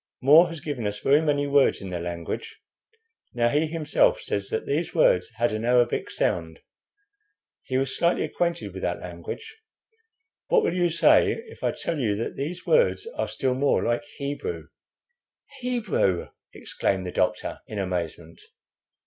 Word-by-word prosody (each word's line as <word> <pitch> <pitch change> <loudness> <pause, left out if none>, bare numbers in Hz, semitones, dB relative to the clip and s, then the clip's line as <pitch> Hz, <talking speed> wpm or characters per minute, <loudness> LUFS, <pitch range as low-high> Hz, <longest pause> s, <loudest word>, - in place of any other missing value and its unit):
More 155 +6 +7
has 165 -3 -7
given 130 -8 -3
us 105 0 -4
very 140 +7 +4
many 145 -2 +1
words 140 -1 +3
in 95 -2 -7
their 90 -1 -3
language. 85 -1 -5 0.8
Now 120 -1 +3
he 150 +5 +1
himself 165 - +2
says - - -3
that 450 0 -2
these 425 - -2
words - - +4
had 120 0 +1
an 110 +1 -3
Arabic 120 0 +2
sound. 80 -2 -1 1.0
He 130 -1 -2
was 135 0 -1
slightly 170 0 +2
acquainted 170 - -2
with 95 - -7
that 90 0 -2
language. 265 - -8 0.9
What 480 -3 +3
will - - +1
you 175 -1 +2
say 165 0 +4
if 455 - -14
I - - +2
tell 165 -3 -3
you 110 -6 +1
that 110 - -4
these 165 +6 -5
words 485 -3 +3
are - - -1
still 130 -1 -1
more 140 +2 +1
like 120 +2 0 0.2
Hebrew?" 145 - -4 0.9
"Hebrew!" 215 - 0 0.2
exclaimed 95 -1 -2
the 90 - -4
doctor, 90 0 -1
in 105 - -7
amazement. 85 -3 -4
135 Hz, 155 wpm, -25 LUFS, -, 1.0 s, More